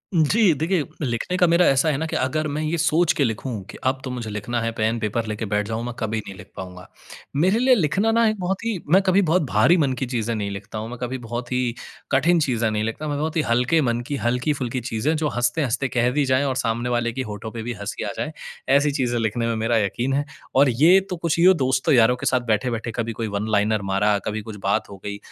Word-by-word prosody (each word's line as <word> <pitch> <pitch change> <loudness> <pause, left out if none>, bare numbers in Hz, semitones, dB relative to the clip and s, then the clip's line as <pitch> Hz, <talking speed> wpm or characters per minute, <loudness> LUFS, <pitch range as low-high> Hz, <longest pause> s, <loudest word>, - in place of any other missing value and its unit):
जी, 175 +4 +4
देखिए, 160 +3 0 0.2
लिखने 125 +7 -2
का 175 - +4
मेरा 170 +1 +4
ऐसा 140 +4 +2
है 145 - 0
ना 160 - -2
कि - - -4
अगर 155 +4 0
मैं 155 - -1
ये 155 +2 -1
सोच 160 +1 +3
के 140 - +3
लिखूँ 120 +2 -2 0.2
कि - - -9
अब 130 0 +1
तो 130 - -5
मुझे 120 -3 -5
लिखना 105 +3 -3
है, 115 0 -1
पेन, 110 +1 0
पेपर 110 +1 -1
लेके 110 +1 -3
बैठ 105 0 -1
जाऊँ, 115 +1 -3
मैं 120 - -4
कभी 110 -1 -2
नहीं 100 - -8
लिख - - -12
पाऊँगा। 90 -1 -8 0.5
मेरे 185 +10 +3
लिए 255 0 +5
लिखना 195 +4 +1
ना 230 0 +3
एक 215 -2 -3
बहुत 185 +3 -2
ही 225 -4 -1 0.2
मैं 195 - +7
कभी 190 +1 +3
बहुत 180 +3 +3
भारी 135 +12 +4
मन 140 -5 +2
की - - +1
चीज़ें 115 -2 -2
नहीं 105 -2 -2
लिखता 100 +2 -7
हूँ, 110 +2 -5
मैं 125 - -7
कभी 125 +1 -3
बहुत 120 +1 -6
ही 125 -2 0 0.4
कठिन 170 +5 +3
चीज़ें 120 -6 +1
नहीं 110 0 -1
लिखता। 115 +8 -4
मैं 145 -1 -2
बहुत 155 +2 -2
ही - - +4
हल्के 125 +7 +3
मन 120 -2 0
की, 145 - -2
हल्की-फुल्की 125 +1 -1
चीज़ें 125 +7 -1
जो 155 -1 0
हँसते-हँसते 120 +2 0
कह 120 +1 +3
दी 145 +1 +1
जाएँ 130 +1 +2
और 130 -2 -1
सामने 120 0 -1
वाले 120 -1 0
की 130 - -3
होठों 110 +2 -6
पे 115 -1 -6
भी 120 +1 -3
हँसी 100 - -4
आ 105 - -3
जाए, 155 +1 -3 0.4
ऐसी 145 +2 +4
चीज़ें 125 -3 -1
लिखने 115 +1 -1
में 115 - 0
मेरा 115 +1 +1
यक़ीन 120 +6 -1
है। 145 +1 0 0.3
और 140 +1 +5
ये 160 +11 +5
तो 180 - -2
कुछ 170 0 -1
यूँ 185 +2 +7
दोस्तों-यारों 130 -3 +3
के - - -7
साथ 130 -1 +2
बैठे-बैठे 115 +2 -1
कभी 115 -1 -2
कोई 110 - -1
वन 105 - -3
लाइनर 105 0 +2
मारा, 105 +1 +2
कभी 110 0 -2
कुछ 105 0 -8
बात 105 +2 0
हो 100 - -10
गई। 100 0 -4
125 Hz, 250 wpm, -23 LUFS, 110-155 Hz, 0.5 s, मैं